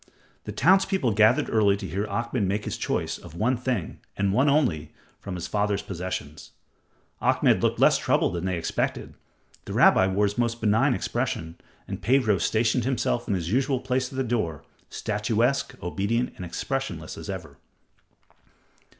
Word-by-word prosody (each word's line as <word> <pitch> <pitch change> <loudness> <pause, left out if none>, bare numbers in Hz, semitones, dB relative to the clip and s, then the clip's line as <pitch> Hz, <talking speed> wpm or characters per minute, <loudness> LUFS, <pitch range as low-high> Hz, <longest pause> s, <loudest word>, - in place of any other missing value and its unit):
The - - -5
townspeople 190 - +3
gathered 110 +3 +4
early 100 -3 +3
to 100 -1 -6
hear 100 +6 -2
Ahmed 115 -2 -1
make 105 +2 -1
his - - -3
choice - - -2
of 80 - -12
one 115 +8 +1
thing 125 -7 -3 0.2
and 100 -1 +1
one 130 +7 +3
only 95 - +1 0.3
from 100 -2 -6
his 85 - -5
father's 105 -1 0
possessions. 90 -5 -6 0.7
Ahmed - - +3
looked - - +1
less - - +5
troubled - - +1
than 85 +1 -3
they 95 -2 -1
expected, 85 - -2 0.5
the - - -6
rabbi 95 - +5
wore 100 +2 +2
his 105 +3 -2
most 120 -1 0
benign 115 +5 +3
expression, 110 -10 -3 0.3
and - - -6
Pedro 115 -5 +3
stationed 115 +2 +1
himself 120 -1 -1
in 100 - +1
his 85 -1 -3
usual 130 +2 +1
place 130 0 -1
at - - -9
the 135 - +1
door, 110 - -2 0.3
statuesque, 115 +5 0
obedient, 100 +7 -1
and 90 - -7
expressionless 85 - -4
as - - -9
ever. - - -7
110 Hz, 160 wpm, -26 LUFS, 95-125 Hz, 0.7 s, less